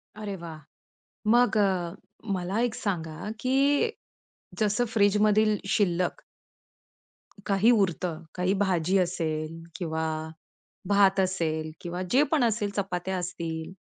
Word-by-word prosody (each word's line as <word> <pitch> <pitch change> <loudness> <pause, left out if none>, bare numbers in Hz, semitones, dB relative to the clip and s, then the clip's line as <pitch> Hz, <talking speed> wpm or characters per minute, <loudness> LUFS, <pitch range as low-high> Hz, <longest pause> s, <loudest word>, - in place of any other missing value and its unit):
अरे 210 -2 -5
वाह! 160 -2 -7 0.8
मग 240 -2 +4
अ, 185 -4 +1 0.4
मला 185 +5 -2
एक 235 - -5
सांगा 170 -1 -3
की 260 +1 +2 1.0
जसं 210 +3 +2
फ्रिजमधील 210 +1 +4 0.2
शिल्लक 180 -3 0 1.2
काही 200 +4 +4
उरतं, 180 -5 0
काही 180 +2 +1
भाजी 185 -1 +2
असेल 165 -2 -2
किंवा 160 -2 -2 0.9
भात 200 -1 +4
असेल 160 -4 -1
किंवा 175 +1 -4
जे 270 +4 +5
पण 295 -6 +3
असेल, 220 -3 +1
चपात्या 190 -1 -2
असतील, 170 -1 -4
185 Hz, 110 wpm, -27 LUFS, 170-205 Hz, 1.2 s, जे